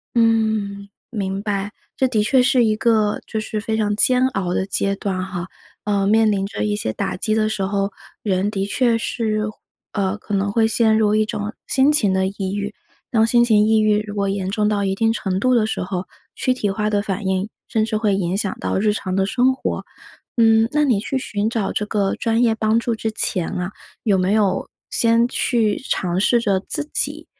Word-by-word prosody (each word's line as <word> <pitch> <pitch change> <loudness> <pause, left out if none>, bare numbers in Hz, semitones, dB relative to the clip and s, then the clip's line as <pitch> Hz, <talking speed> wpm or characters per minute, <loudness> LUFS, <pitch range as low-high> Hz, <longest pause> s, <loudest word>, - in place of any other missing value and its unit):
嗯， 220 -3 +1 0.2
明 195 -4 -3
白。 205 -1 -2 0.2
这 260 - +2
的 215 -4 +1
确 255 +3 +4
是 255 -1 +3
一 215 -1 +2
个， 215 -2 +2
就 220 - -3
是 215 0 -3
非 220 +1 -2
常 210 -1 0
煎 255 +3 +4
熬 185 -6 -2
的 190 - 0
阶 195 0 0
段 190 -2 -3
哈， 185 -1 -5 0.4
呃， 200 -1 0
面 220 0 +4
临 195 -1 0
着 200 - -4
一 210 -1 0
些 110 - -2
打 - - -3
击 215 +2 0
的 215 0 +1
时 195 -3 -2
候， 195 +1 -1 0.3
人 195 -1 0
的 195 -2 -1
确 230 +2 +1
是， 220 -2 -1 0.5
呃， 200 0 -1
可 210 - -8
能 200 +1 0
会 225 0 +3
陷 220 -1 +3
入 215 -1 +3
一 215 0 +3
种 210 +1 -4
心 275 +2 +4
情 210 -11 +3
的 190 0 +1
抑 195 0 -4
郁。 205 0 -3 0.4
当 225 -2 +3
心 240 +1 +4
情 210 -2 +4
抑 220 0 +3
郁 210 0 +2
如 205 - -7
果 200 -1 -1
严 195 -1 -2
重 210 0 +1
到 205 -1 0
一 195 -1 0
定 225 +2 +1
程 190 -4 -2
度 255 +3 +2
的 220 -3 +3
时 220 - -3
候， 180 0 -3 0.3
躯 255 - +1
体 210 -5 -2
化 210 +1 -1
的 205 -1 +1
反 195 -1 -4
应， 190 +2 -1 0.2
甚 220 - 0
至 220 -1 -1
会 210 -3 +1
影 185 0 -1
响 205 -2 -1
到 - - -1
日 210 +1 +2
常 185 -3 -3
的 195 0 +2
生 260 +4 +2
活。 260 - -3 0.5
嗯， 225 -1 +4
那 300 0 +3
你 235 -8 +2
去 265 +4 -2
寻 215 -3 -2
找 220 -4 -1
这 210 - -1
个 205 -2 0
专 230 0 0
业 230 -2 +3
帮 220 +1 +1
助 235 0 -1
之 220 0 -3
前 180 -5 -1
啊， 180 0 -4 0.3
有 200 -4 +3
没 185 +2 +1
有 210 -3 +1 0.2
先 230 0 +3
去 225 -5 +1
尝 180 -1 0
试 235 +3 +3
着 195 -4 +1
自 295 +8 -3
己 - - 0
210 Hz, 230 characters per minute, -20 LUFS, 195-225 Hz, 0.5 s, 确